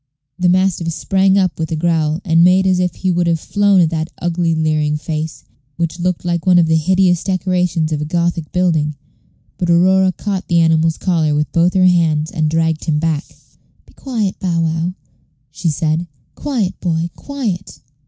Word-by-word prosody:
The 180 0 +2
mastiff 180 -2 +1
sprang 190 +3 +1
up 185 -4 0
with 160 0 -3
a - - 0
growl, 160 0 0
and 165 -1 +4
made 185 +2 +4
as 185 -1 +2
if 180 -1 -1
he 185 - -1
would 175 0 0
have 165 -1 +1
flown 205 +2 +2
at 165 -1 +2
that 160 0 -2
ugly 170 -1 0
leering 155 -1 0
face, 155 0 -5 0.3
which 170 0 -3
looked 180 0 -2
like 170 -1 -1
one 180 -1 +5
of 170 - +5
the 160 0 +2
hideous 180 +2 +2
decorations 180 -4 0
of 150 -1 -1
a - - -2
Gothic 170 -1 -2
building; 160 -5 0 0.6
but 175 - -1
Aurora 185 +2 +4
caught 195 0 -4
the 170 - +1
animal's 160 0 +2
collar 160 -5 0
with 150 -1 -1
both 170 +2 +2
her 185 -1 +4
hands, 160 -4 +2
and 155 -3 0
dragged 160 0 0
him 155 -2 0
back. 155 -1 -1 0.6
"Be - - -22
quiet, 225 -8 -3
Bow 170 -3 0
wow," 165 +2 -1 0.6
she 165 +3 -2
said; 155 +3 -1 0.3
"quiet, 240 -10 -3
boy, 170 -1 -2
quiet." 230 -11 -5
170 Hz, 185 wpm, -17 LUFS, 160-185 Hz, 0.6 s, one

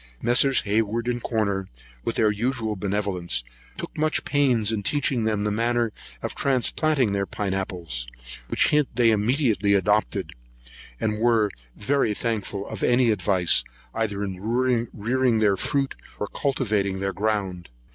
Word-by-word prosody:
Messrs. 125 +3 +3
Hayward 110 +3 0
and 120 0 -1
Corner, 100 -5 -1 0.4
with - - -2
their 110 -1 +3
usual 110 0 -1
benevolence, 95 -6 -2 0.3
took - - -7
much 155 +1 0
pains 125 -7 +2
in 110 -2 -1
teaching 130 0 +1
them 105 -2 0
the 105 - 0
manner 115 +1 +1 0.3
of - - -3
transplanting 135 -1 +1
their 100 -1 -1
pine 100 -2 -3
apples; 85 - -4 0.4
which - - +3
hint 150 -2 +3
they 115 -2 +5
immediately 110 - +2
adopted, 105 - +1 0.7
and 105 -1 -1
were 115 -3 +3 0.2
very 115 -1 +1
thankful 105 -4 -3
for - - -6
any 120 -1 +4
advice, 90 - +2 0.3
either 105 -3 -1
in 95 -2 -4
rearing 120 +1 +1
their 105 -2 +3
fruit, 135 +7 0 0.3
or - - -1
cultivating 105 -7 -1
their 95 0 -1
ground. 95 - -2
110 Hz, 140 wpm, -25 LUFS, 100-120 Hz, 0.7 s, they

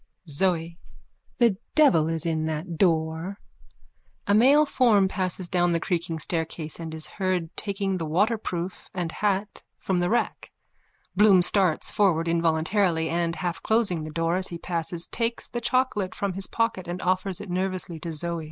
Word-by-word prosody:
ZOE: 165 +2 -1 0.6
The 230 -6 +3 0.2
devil 175 - +5
is 165 -1 -2
in 160 -1 0
that 160 +2 -4
door. 165 +1 +1 0.9
_(A 200 - +3
male 275 +7 +6
form 230 -9 +3
passes 185 -1 -1
down 175 -1 +1
the 165 - +1
creaking 170 -2 -2
staircase 160 0 -3
and 165 -1 -6
is 155 - +1
heard 185 -4 -2
taking 195 -2 -2
the 165 - -2
waterproof 185 0 -1
and 175 -3 -2
hat 205 +1 -1 0.2
from 185 -2 -1
the 175 0 +1
rack. 240 - -1 0.7
Bloom 195 -2 +6
starts 180 -4 +2
forward 170 -5 +2
involuntarily 165 +1 +1
and, 170 0 0
half 175 -1 -3
closing 215 -8 +1
the 155 - -6
door 165 +2 0
as 185 - -1
he 170 - -6
passes, 170 0 -2
takes 230 0 -2
the 240 - -5
chocolate 235 -5 0
from 200 -2 -2
his 195 +1 -5
pocket 230 -6 -1
and 175 +1 -4
offers 185 0 0
it 205 -3 -7
nervously 185 -2 -2
to 165 +2 -5
Zoe.) 170 +2 -3
180 Hz, 160 wpm, -25 LUFS, 165-200 Hz, 0.9 s, male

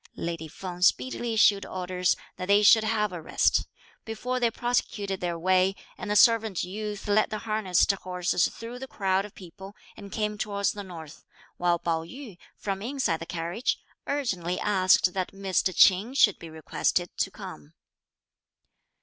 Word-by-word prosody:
Lady 165 -1 -4
Feng 180 +2 -8
speedily 235 +4 +1
issued 205 -2 +5
orders 180 -1 -1 0.2
that 185 - -5
they 205 +1 +5
should 220 +1 +7
have 215 -3 0
a 175 - -6
rest, - - +1 0.4
before 250 +3 -3
they 240 -1 +3
prosecuted 210 -5 -2
their 175 -1 -2
way, 185 +2 +2 0.2
and - - -7
the 210 - +1
servant 225 -4 +4
youth 210 +3 -5
led 210 +1 +3
the 215 - -3
harnessed 215 -4 +2
horses 180 -2 0
through 235 +2 -9
the 265 - -7
crowd 195 -4 0
of 210 - -13
people 190 +2 -11 0.2
and 200 -2 -11
came 210 0 -2
towards 200 -1 0
the 205 - -7
north, 165 -6 -10 0.3
while 175 -1 +2
Pao 165 -1 -1
yü, 215 - -10 0.2
from 195 -1 -4
inside 240 - -1
the 165 - -8
carriage, 175 - -2 0.3
urgently 185 -11 -2
asked 185 -2 +3
that 185 -1 -3
Mr. 195 -1 0
Ch'in 195 +8 +4
should 205 -7 +4
be 165 - -9
requested 160 +2 -1
to - - 0
come. 75 +1 -11
195 Hz, 160 wpm, -27 LUFS, 180-215 Hz, 0.4 s, should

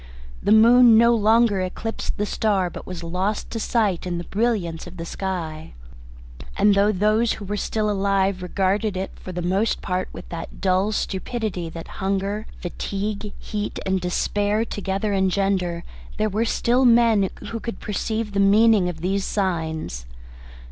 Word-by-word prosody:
The - - 0
moon 230 +1 +7
no 235 +1 +6
longer 220 -2 +3
eclipsed 200 +5 -4
the 210 - 0
star 200 -4 0
but - - -9
was 180 -2 -6
lost 185 +5 -2
to 225 - -3
sight 210 -7 0
in 175 -1 -2
the 170 - -4
brilliance 195 -6 -1
of 180 +1 -11
the 165 - -5
sky. 165 - -5 0.8
And 205 - +5
though 200 +1 +4
those 215 +4 +2
who 205 - -8
were 205 +2 -3
still 215 +1 -1
alive 195 -2 +1
regarded 195 +2 0
it 190 +1 -3
for 185 - -8
the 175 -1 -4
most 195 +5 +1
part 185 0 -2
with - - -10
that 165 -1 -7
dull 190 +2 +2
stupidity 195 -3 -3
that 165 0 -8
hunger, 195 +2 -1 0.2
fatigue, 200 +3 -4
heat 210 -1 -4
and 190 -1 0
despair 205 +4 0
engender, 195 -3 0 0.3
there 215 - +1
were 215 +3 0
still 240 +2 +2
men 230 -5 +5 0.2
who 230 - -3
could 230 +1 -6
perceive 220 +1 -3
the 200 - 0
meaning 205 -1 +5
of 160 -2 -7
these 195 +2 0
signs. 160 - -2
200 Hz, 155 wpm, -23 LUFS, 185-215 Hz, 0.8 s, moon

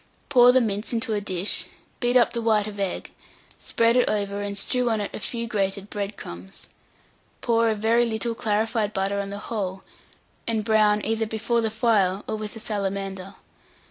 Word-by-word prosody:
Pour 245 -1 +7
the 260 +1 +4
mince 210 0 -1
into 225 -1 -1
a 205 - 0
dish, 190 -1 0 0.3
beat 245 0 +3
up 240 - +3
the 235 - -2
white 215 -2 +3
of 205 -1 -7
egg, 195 -2 -3 0.5
spread 230 +1 +2
it 250 - +4
over, 200 -1 -1
and 200 0 -3
strew 250 +4 +1
on 220 -1 +1
it 205 - -4
a - - -5
few 235 +2 -3
grated 200 -2 -2
bread 205 0 -4
crumbs; 90 +2 -10 0.7
pour 230 -1 +3
a 220 - +1
very 225 +3 +3
little 230 +1 -1
clarified 220 -1 0
butter 195 +1 0
on 200 0 -3
the 200 - -5
whole, 195 -3 -4 0.6
and 220 -2 +1
brown 215 -2 +3
either 225 0 0
before 225 +2 0
the 220 - 0
fire 210 -4 +2
or - - -2
with 215 0 -6
a - - -7
salamander. 195 -2 -4
215 Hz, 185 wpm, -25 LUFS, 200-230 Hz, 0.7 s, Pour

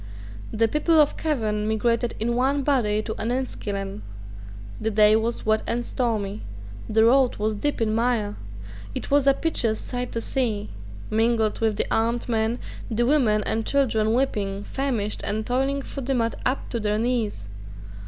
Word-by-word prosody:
The 225 +1 +2
people 310 +5 +2
of 295 -1 +4
Cavan 215 -9 -1
migrated 230 +2 0
in 235 +2 0
one 270 +3 +1
body 215 -7 +1
to 220 - -3
Enniskillen. 205 - -3 0.8
The 220 - -1
day 215 0 +5
was 225 +2 -1
wet 220 0 +2
and 240 +1 -1
stormy. 215 -5 -2 0.5
The 220 +1 +4
road 260 +1 +4
was 215 +1 -1
deep 290 +8 -2
in 220 -2 +1
mire. 225 -3 0 0.6
It - - -5
was 285 -1 +4
a 275 - +6
piteous 235 -10 0
sight 250 0 -4
to 230 - -1
see, 230 -4 -1 0.4
mingled 225 0 +1
with 220 -2 +1
the - - +1
armed 230 +2 +1
men, 225 0 0 0.3
the 235 +1 +1
women 240 -7 +3
and 225 - 0
children 225 -5 +2
weeping, 205 -6 -1
famished, 240 -7 -2
and 215 +2 -1
toiling 270 +3 0
through 275 -1 -6
the 270 0 0
mud 230 -1 0
up 260 +2 -2
to 235 - -1
their 210 -1 0
knees. 225 - -1
230 Hz, 165 wpm, -24 LUFS, 215-255 Hz, 0.8 s, a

